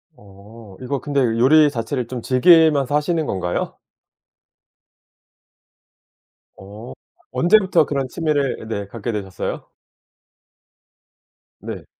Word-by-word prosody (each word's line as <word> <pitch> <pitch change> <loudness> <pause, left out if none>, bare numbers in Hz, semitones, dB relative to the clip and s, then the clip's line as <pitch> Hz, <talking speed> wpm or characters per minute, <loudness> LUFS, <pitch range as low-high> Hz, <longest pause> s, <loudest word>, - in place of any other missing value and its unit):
어. 100 +1 -16
이거 135 +2 -3
근데 145 0 -2
요리 130 +6 +4
자체를 125 -1 -4
좀 125 -1 -6
즐기면서 145 +1 +4
하시는 155 +2 0
건가요? 90 -6 -3 2.8
어. 105 +5 -11 0.4
언제부터 190 -2 +3
그런 140 -2 -2
취미를 145 -5 -2
네 100 -3 -4
갖게 115 +3 -5
되셨어요? 95 -4 -5 1.9
네. - - -8
125 Hz, 195 characters per minute, -20 LUFS, 110-150 Hz, 2.8 s, 요리